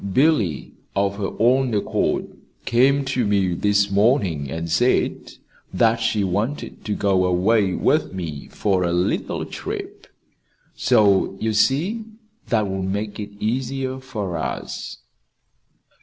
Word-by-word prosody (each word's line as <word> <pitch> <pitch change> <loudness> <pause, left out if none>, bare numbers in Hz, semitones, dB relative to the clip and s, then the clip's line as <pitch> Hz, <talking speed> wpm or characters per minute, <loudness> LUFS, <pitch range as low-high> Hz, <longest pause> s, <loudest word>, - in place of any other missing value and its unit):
"Billy, 130 - +2 0.2
of 100 0 0
her 100 - -1
own 125 +1 +3
accord, 100 - 0 0.4
came 135 +4 +3
to 130 -2 0
me 100 -4 +1
this 100 +2 +2
morning, 100 - +2
and 80 +3 -4
said 120 +10 +1 0.4
that 115 +5 +3
she 110 -2 0
wanted 105 +10 -3
to 105 -1 -1
go 95 -2 +2
away 95 +2 +2
with - - +1
me 80 -6 -6
for 95 -3 0
a 85 -1 0
little 90 +1 -1
trip. - - -7 0.7
So 100 -2 +3
you 110 0 -1
see 165 - +1 0.4
that 110 -5 +1
will 95 0 -3
make 100 +3 -3
it 105 - -5
easier 130 +3 -2
for 105 -9 -4
us." - - -5
105 Hz, 125 wpm, -22 LUFS, 95-125 Hz, 0.7 s, own